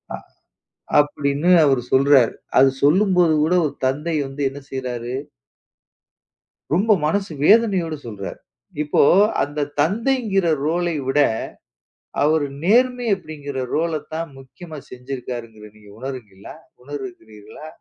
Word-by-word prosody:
அ - - -8 0.8
அப்படின்னு 145 +2 +1
அவரு 135 -4 +3
சொல்றாரு, 135 -3 +5 0.3
அது 135 - +6
சொல்லும்போது 180 +1 +4
கூட 165 +3 +1
ஒரு 145 - -5
தந்தை 150 +5 -1
வந்து 135 +2 -6
என்ன 140 +1 -9
செய்றாரு? 125 -2 -4 1.6
ரொம்ப 200 +7 +2
மனசு 195 +4 -1
வேதனையோடு 195 -7 +3
சொல்றார். 105 -4 -7 0.5
இப்போ 150 - +2 0.4
அந்தத் 145 0 -4
தந்தைங்கிற 210 - +1 0.2
ரோலை 170 +1 0
விட 135 +2 +1 1.0
அவர் 155 0 +2 0.2
நேர்மை 245 +5 +2
அப்படிங்கிற 145 -6 -8 0.2
ரோலத் 155 -2 -2
தான் 165 0 -4
முக்கியமா 155 +4 -11
செஞ்சிருக்காருங்கறது 120 -4 -8
நீங்க 105 -1 -17
உணருகிறீர்களா 120 -8 -8 0.3
உணருகிறீர்களா? 145 - -10
145 Hz, 105 wpm, -21 LUFS, 130-175 Hz, 1.6 s, அது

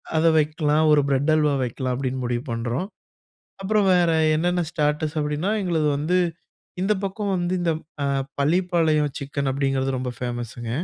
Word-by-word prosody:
அதை 165 +1 +4
வெக்கலாம், 155 0 +1
ஒரு 150 -1 +5
பிரெட் 140 +3 +2
அல்வா 150 -2 +2
வெக்கலாம் 125 +1 -2
அப்டின்னு 130 -1 -3
முடிவு 120 +1 -2
பண்றோம். 120 +10 -2 0.8
அப்புறம் 210 0 +2
வேற 175 -2 +3 0.3
என்னன்னா 175 +2 +1
ஸ்டாட்டர்ஸ் 150 -1 -1
அப்டின்னா 150 +6 -1
எங்களது 160 -4 +1
வந்து 170 +5 +1 0.6
இந்த 205 +2 +2
பக்கம் 195 +1 -2
வந்து 175 0 -1
இந்த 170 -1 +1 0.3
அ - - +1 0.3
-பள்ளிப்பாளையம் 160 -2 +2
சிக்கன் 140 0 -3
அப்டிங்கிறது 135 -1 0
ரொம்ப 125 -1 -3
ஃபேமஸுங்க. 120 -1 -5
150 Hz, 145 wpm, -23 LUFS, 135-175 Hz, 0.8 s, ஒரு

